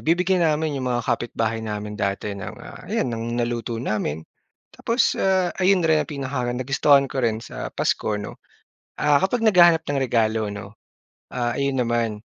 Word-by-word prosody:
bibigyan 180 +3 +2
namin 155 -1 +1
'yong 130 - -2
mga 120 -1 0
kapitbahay 115 -2 -1
namin 105 -1 -5
dati 100 +1 -2
ng, 100 -2 -7
ah, - - -11
ayan - - 0
ng 115 +1 -3
naluto 120 -1 -2
namin. 100 - -2 0.5
Tapos, 230 +3 +1
ah, 185 -2 +2
ayon 185 -1 +3
rin 160 -1 +3
ang 145 - -12
pinaka-nagustuhan 135 0 +1
ko 135 - -2
rin 110 -2 +1
sa - - -6
Pasko 105 - 0
'no, 105 - -8 0.6
ah, 145 -1 +3
kapag 225 +5 0
naghahanap 175 -6 +6
ng 145 -1 -1
regalo 110 -3 +1
'no. 100 0 -8 0.6
Ah, 120 -1 -1
ayon 140 -1 0
naman, 115 -3 0
125 Hz, 160 wpm, -23 LUFS, 115-155 Hz, 0.6 s, naghahanap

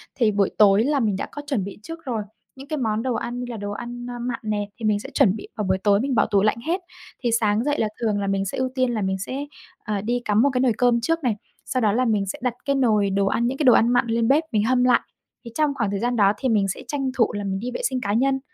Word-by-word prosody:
thì 225 -4 +2
buổi 200 -1 +2
tối 205 +1 +6
là 285 +1 +1
mình 210 -5 +1
đã - - -3
có 290 - -6
chuẩn 245 -10 0
bị 200 - -7
trước 330 -2 -9
rồi, 225 -5 -2 0.3
những 270 +1 -11
cái 310 -1 -3
món 225 -2 -1
đồ 255 -2 0
ăn 240 +1 -4
như 250 - -3
là 230 - -5
đồ 205 0 -5
ăn, 240 +3 -6
a, 245 0 -6
mặn 240 -1 -3
nè 205 -1 -2
thì 220 - -4
mình 210 -1 +2
sẽ 265 - -8
chuẩn 220 -9 +4
bị - - -8
vào 210 - -2
buổi 190 0 +2
tối 200 +1 +3
mình 265 -2 -1
bỏ - - +4
tủ 200 -3 +2
lạnh 215 - +2
hết. 365 +3 0 0.4
Thì 235 - +1
sáng 220 -1 +2
dậy 290 +2 0
là 220 - +2
thường 215 -3 +1
là 200 - -2
mình 195 0 0
sẽ 195 - -4
ưu 260 0 0
tiên 255 -2 +1
là 215 - -1
mình 190 0 -1
sẽ, 265 +9 -4 0.4
à, 210 -2 -2
đi 240 +3 -1
cắm 210 +1 +3
một 280 - +4
cái 250 - +1
nồi 250 -4 +3
cơm 240 -1 +3
trước 330 +4 0
này, 235 -4 +1 0.3
sau 255 - -1
đó 215 - +3
là 250 +4 +1
mình 210 -3 +1
sẽ 190 - -5
đặt 250 -1 0
cái 280 - +1
nồi 215 -7 +2
đồ 195 0 +1
ăn, 235 +4 +1
những 260 +2 -2
cái 305 - -1
đồ 250 -4 +7
ăn 230 - +4
mặn 245 -1 +3
lên 230 0 +1
bếp 300 +4 +4
mình 210 -2 +2
hâm 250 +2 +2
lại. 250 -1 +5 0.5
Thì 235 - -8
trong 300 -2 +2
khoảng 205 -6 -1
thời 200 - -2
gian 245 +1 0
đó 200 -2 +4
thì 260 - -1
mình 205 -3 +2
sẽ 190 - -4
tranh 275 -3 -2
thủ 230 - +2
là 205 0 -3
mình 195 -1 -2
đi 245 +3 -4
vệ - - -4
sinh 255 -1 -2
cá 205 - -1
nhân, 270 +4 +2
230 Hz, 310 wpm, -23 LUFS, 205-255 Hz, 0.5 s, đồ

